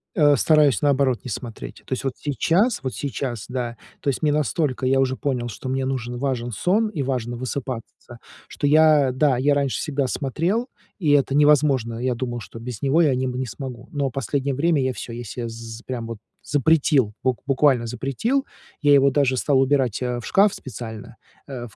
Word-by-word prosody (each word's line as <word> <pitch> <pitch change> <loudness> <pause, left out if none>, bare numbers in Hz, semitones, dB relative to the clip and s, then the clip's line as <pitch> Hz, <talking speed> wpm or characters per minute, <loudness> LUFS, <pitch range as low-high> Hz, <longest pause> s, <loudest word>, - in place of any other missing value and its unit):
Э, 145 -5 +5
стараюсь 150 -3 +4
наоборот 135 -4 +2
не - - -6
смотреть. 115 0 -7
То - - -4
есть 130 - -3
вот 135 -2 -1
сейчас 170 - +1
вот 130 -2 -3
сейчас, 130 -5 -4
да, 120 -2 -4 0.2
то - - 0
есть 135 - -2
мне 150 -2 +2
настолько 145 -1 0
я 135 +1 +3
уже 130 -1 +1
понял, 130 -4 -2
что 125 +4 -7
мне 130 0 -1
нужен, 125 -2 -3
важен 120 -2 -2
сон 200 - +1
и 160 -10 -3
важно 125 -3 -2
высыпаться, 125 -1 -6 0.3
что - - -4
я, 150 -2 +5
да, 130 0 +2
я 140 +3 +3
раньше 140 -2 0
всегда 140 -3 -1
смотрел, 170 - -1 0.3
и 160 -7 +1
это 140 -1 +3
невозможно. 140 -6 +3
Я 125 0 0
думал, 120 0 -4
что 110 +1 -10
без 120 -2 -7
него 140 +4 +3
я 150 -5 +4
не 130 +1 -1
м 125 - -2
не 130 +1 -2
смогу, 125 +1 -8
но 140 -2 -1
в - - -13
последнее 135 +1 -2
время 155 +1 +2
я 130 0 0
всё, 120 - -7
я 120 +1 -6
се 120 +2 -5
з 115 0 -8
прям 120 -3 -4
вот 115 -1 -6 0.3
запретил, 145 -5 +2
бук 130 -1 0
буквально 135 -3 +3
запретил, 135 - -1 0.4
я 145 -1 +5
его 140 0 +5
даже 130 -2 +2
стал 135 +1 +2
убирать 135 -4 +1
а, 125 -1 -2
в 120 - -9
шкаф 200 +1 +4
специально, 115 -1 -8 0.3
э, 130 -4 -6
ф 110 - -14
130 Hz, 200 wpm, -23 LUFS, 120-145 Hz, 0.4 s, Э